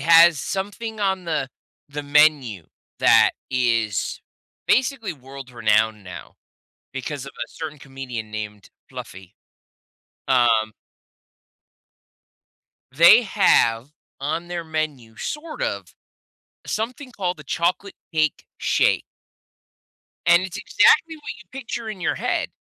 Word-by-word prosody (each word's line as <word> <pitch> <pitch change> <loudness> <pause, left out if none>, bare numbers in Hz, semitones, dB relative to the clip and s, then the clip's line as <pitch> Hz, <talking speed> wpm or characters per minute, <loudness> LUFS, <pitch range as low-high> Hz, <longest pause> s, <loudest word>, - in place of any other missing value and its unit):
has 165 -1 +7
something 205 - -4
on 190 -2 0
the 155 -5 -1 0.4
the 145 +1 -5
menu 145 - +3 0.3
that - - +6 0.2
is 115 -5 0 0.5
basically 255 -5 +1
world-renowned 120 -6 -1
now 90 -1 -10 0.6
because 135 +1 -5
of 140 - -9
a 120 - -4
certain 155 -2 -7
comedian 125 -5 -7
named 105 -2 -7 0.2
Fluffy. 95 -1 -10 0.9
Um 115 -4 +3 2.2
They 170 - +8
have, 130 - +3 0.3
on 165 +5 -3
their 175 -1 -4
menu, 150 -8 -4
sort 310 - -6
of, - - -3 0.7
something 250 +4 -4
called 180 -6 -3
the 150 - -11
Chocolate 175 +6 -1 0.2
Cake 155 -2 0
Shake - - +2 1.2
and 170 +1 +6
it's 185 -1 -5
exactly 335 -9 +3
what 295 -1 -7
you - - -38
picture 240 -3 -5
in 210 -4 -6
your 180 - 0
head. - - -1
155 Hz, 110 wpm, -23 LUFS, 120-190 Hz, 2.2 s, They